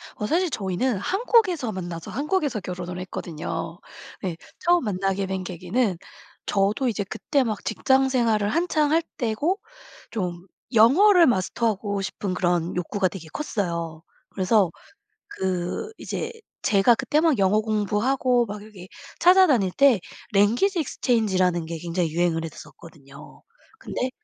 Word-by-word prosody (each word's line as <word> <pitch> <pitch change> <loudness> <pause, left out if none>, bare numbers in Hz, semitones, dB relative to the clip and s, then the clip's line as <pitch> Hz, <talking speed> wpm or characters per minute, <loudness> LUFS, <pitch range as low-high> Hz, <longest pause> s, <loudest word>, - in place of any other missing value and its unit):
어 210 - -4
사실 345 +7 +1
저희는 210 0 -1
한국에서 370 - +1
만나서 175 -3 -6
한국에서 290 - -1
결혼을 180 -1 -6
했거든요. 170 -1 -5 0.4
네 175 -3 -2 0.2
처음 350 -2 +3
만나게 195 0 -1
된 190 -1 -3
계기는 185 +3 -1 0.5
저도 205 +7 +1
이제 215 -3 -1
그때 275 +7 -1
막 215 -4 -3
직장 265 +4 +2
생활을 225 -5 +1
한창 310 -2 +1
할 330 +1 +3
때고 270 - 0 0.5
좀 180 -3 -4 0.3
영어를 335 - +6
마스터하고 205 -1 0
싶은 195 -1 -3
그런 175 -1 0
욕구가 185 +2 0
되게 170 -3 -8
컸어요. 170 - -3 0.3
그래서 190 -2 +2 0.6
그 190 - -3
이제 460 +1 -4 0.3
제가 205 +3 +4
그때 300 +6 +1
막 315 -8 +2
영어 195 +2 +3
공부하고 225 +4 +1
막 205 0 -7
이렇게 195 -4 -12 0.3
찾아다닐 335 - +5
때 270 -8 +4 0.3
랭귀지 240 - +3
익스체인지 225 -8 0
라는 175 -2 +2
게 165 0 -5
굉장히 170 0 -2
유행을 165 -1 0
했었거든요. 150 -3 -12 0.4
근데 255 +1 -3
205 Hz, 300 characters per minute, -24 LUFS, 180-265 Hz, 0.6 s, 영어를